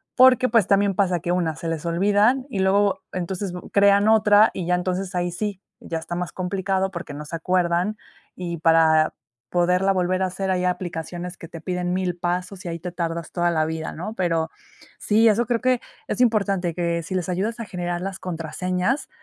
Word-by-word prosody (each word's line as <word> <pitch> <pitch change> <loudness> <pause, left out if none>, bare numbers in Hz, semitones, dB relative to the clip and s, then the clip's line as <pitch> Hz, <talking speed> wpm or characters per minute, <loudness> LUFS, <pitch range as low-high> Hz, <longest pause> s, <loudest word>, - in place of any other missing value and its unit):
Porque, 255 0 +6
pues, 225 -4 +3
también 200 0 +3
pasa 180 -4 +1
que, 175 - -2
1, 170 -3 0
se 165 - -6
les 165 0 -3
olvidan 205 +9 +3
y 205 - -3
luego, 195 0 +2
entonces, 185 +1 -3 0.2
crean 200 +1 +5
otra, 215 0 +6
y 180 - -4
ya 180 - +3
entonces 185 +1 -2
ahí 175 0 0
sí, 200 +2 -3 0.2
ya 165 - -4
está 160 - -6
más 180 0 -3
complicado, 190 +1 -1
porque, 170 -5 -7
no 150 +1 -7
se 160 - -6
acuerdan, 180 +3 0 0.4
y 175 -2 -4
para 160 -1 +4 0.3
poderla 180 +3 +2
volver 185 0 +1
a - - +3
hacer, 190 +1 -3
hay 180 -1 +1
aplicaciones 175 0 -4
que 165 - -10
te 165 -1 -10
piden 180 +1 -2
1000 180 -1 -1
pasos 180 +2 -3
y - - -4
ahí 165 0 -4
te 180 +2 -6
tardas 170 -2 -4
toda 175 -1 +1
la 155 -2 +1
vida, 160 0 -4
¿no? 200 +7 -6
Pero 165 -4 0 0.5
sí, 220 +2 +3
eso 225 +2 +3
creo 235 0 0
que 255 -1 +2 0.3
es - - -1
importante, 200 -7 +2
que 170 0 -1
si 180 - -6
les 185 -1 -2
ayudas 205 +6 -2
a 230 - -4
generar 175 -2 -3
las 190 0 -4
contraseñas, 180 - -2
180 Hz, 195 wpm, -23 LUFS, 170-200 Hz, 0.5 s, Porque